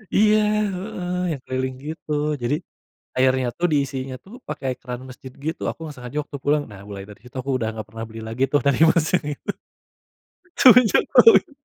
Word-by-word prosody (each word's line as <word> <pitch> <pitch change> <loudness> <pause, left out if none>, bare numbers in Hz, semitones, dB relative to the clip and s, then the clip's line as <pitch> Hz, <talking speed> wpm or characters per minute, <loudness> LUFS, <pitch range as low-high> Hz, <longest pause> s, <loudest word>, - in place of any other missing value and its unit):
Iya 215 +1 +5 0.4
heeh, 180 -1 -5 0.2
yang 140 -4 -4
keliling 130 0 -2
gitu. 155 0 -7 0.3
Jadi 120 +4 +1 0.6
airnya 130 -1 +3
tuh, 175 - +2
diisinya 135 -2 -1
tuh 200 - -13
pakai 135 - -3
keran 125 0 -6
masjid 130 0 -11
gitu. 160 - -3
Aku - - -9
enggak 150 -3 -7
sengaja 125 +2 -8
waktu 145 - -8
pulang. 150 +1 +2
Nah, 100 -2 -11
mulai 100 -1 -7
dari 105 -1 -13
situ 125 +2 -13
aku 135 +2 -4
udah 110 -3 -1
gak 105 - -7
pernah 115 +1 -7
beli 110 0 -9
lagi 115 +4 -3
tuh 145 - +4
dari 140 0 +3
mas 160 -1 +3
yang 155 - -5
itu - - -6 1.1
semenjak 250 -3 +7
tau 455 - +9
itu. - - -5
135 Hz, 190 wpm, -23 LUFS, 125-160 Hz, 1.1 s, tau